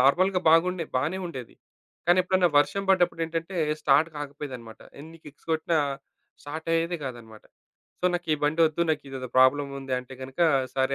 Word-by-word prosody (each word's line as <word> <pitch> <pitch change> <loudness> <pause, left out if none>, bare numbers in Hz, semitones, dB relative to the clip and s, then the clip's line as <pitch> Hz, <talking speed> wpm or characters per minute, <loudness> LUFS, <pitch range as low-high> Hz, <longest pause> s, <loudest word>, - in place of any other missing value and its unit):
నార్మల్‌గా 180 +8 +3
బాగుండేది 165 0 +2
బానే 155 +8 -1
ఉండేది. 130 -8 -8 0.5
కానెప్పుడన్నా 180 0 +3
వర్షం 195 +7 +1
పడ్డప్పుడేంటంటే, 165 -1 0 0.2
స్టార్ట్ 150 +3 +4
కాకపోయేదనమాట. 140 -6 -8 0.2
ఎన్ని 160 +3 -12
కిక్స్ 150 +2 -15
కొట్టినా 160 0 +1 0.6
స్టార్టయ్యేది 165 +3 -2
కాదన్నమాట. 115 -4 -9 0.6
సో, - - -7
నాకీ 175 -2 -1
బండొద్దు 160 +2 +2
నాకు 150 -2 -1
ఇదేదో 130 -2 -6
ప్రాబ్లముంది 135 0 +2
అంటే 125 +1 -10
గనుక 135 +6 -8 0.3
సరే, 135 0 +1
155 Hz, 125 wpm, -26 LUFS, 135-170 Hz, 0.6 s, స్టార్ట్